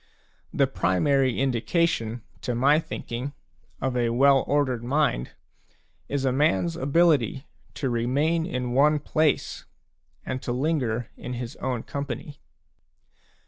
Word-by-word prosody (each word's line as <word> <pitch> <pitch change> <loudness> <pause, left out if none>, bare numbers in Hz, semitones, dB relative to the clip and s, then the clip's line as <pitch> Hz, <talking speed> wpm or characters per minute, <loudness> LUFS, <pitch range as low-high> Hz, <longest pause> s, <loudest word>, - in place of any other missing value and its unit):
The - - +3
primary 130 +7 +1
indication, 125 -2 0 0.2
to 125 - -2
my 140 +5 +4
thinking, 140 -4 -5 0.5
of 130 -1 -1
a 120 -1 +1
well 135 +3 +4
ordered 130 -4 +1
mind 130 - 0 0.8
is 140 -1 -1
a 130 - +3
man's 95 - +2
ability 140 -3 +2 0.3
to 135 - -2
remain 140 +8 +1
in 125 -8 -3
one 150 +4 +4
place 155 0 0 0.6
and 130 0 -4
linger 125 -3 -1
in 125 - -6
his 120 -1 -5
own 125 -3 -2
company. 140 +1 -6
130 Hz, 115 wpm, -25 LUFS, 120-145 Hz, 0.8 s, my